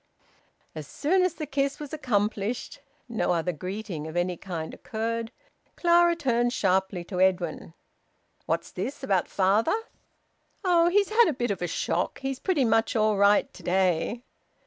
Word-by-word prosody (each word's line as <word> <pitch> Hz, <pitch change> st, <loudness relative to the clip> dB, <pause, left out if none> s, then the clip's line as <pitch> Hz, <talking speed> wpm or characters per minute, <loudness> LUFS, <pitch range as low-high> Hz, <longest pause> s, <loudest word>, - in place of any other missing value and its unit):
As 155 Hz, -3 st, -7 dB
soon 365 Hz, -, +1 dB
as 365 Hz, -2 st, +1 dB
the 305 Hz, -, -4 dB
kiss 275 Hz, -1 st, -1 dB
was 295 Hz, -1 st, -8 dB
accomplished 215 Hz, -4 st, -1 dB, 0.3 s
no 230 Hz, -6 st, 0 dB
other 170 Hz, +1 st, 0 dB
greeting 180 Hz, -1 st, -5 dB
of 160 Hz, +2 st, -5 dB
any 175 Hz, 0 st, 0 dB
kind 165 Hz, -3 st, -6 dB
occurred 230 Hz, 0 st, -4 dB, 0.4 s
Clara 345 Hz, 0 st, +4 dB
turned 240 Hz, -6 st, +1 dB
sharply 190 Hz, -3 st, 0 dB
to 180 Hz, +1 st, -5 dB
Edwin 175 Hz, -3 st, 0 dB, 0.7 s
"What's -, -, -1 dB
this 275 Hz, +1 st, -5 dB
about 195 Hz, -7 st, +1 dB
father?" 205 Hz, -, +2 dB, 0.9 s
"Oh! 345 Hz, -2 st, +4 dB
He's 400 Hz, +2 st, +2 dB
had 455 Hz, +2 st, +5 dB
a 315 Hz, -, +1 dB
bit 240 Hz, -4 st, -1 dB
of 195 Hz, -, -4 dB
a 175 Hz, -, -1 dB
shock. 175 Hz, +1 st, -1 dB
He's 270 Hz, -1 st, -3 dB
pretty 330 Hz, -9 st, +1 dB
much 225 Hz, 0 st, +2 dB
all 215 Hz, -1 st, +3 dB
right 200 Hz, +1 st, +3 dB
to -, -, -13 dB
day." 185 Hz, +5 st, 0 dB
220 Hz, 155 wpm, -27 LUFS, 185-275 Hz, 0.9 s, had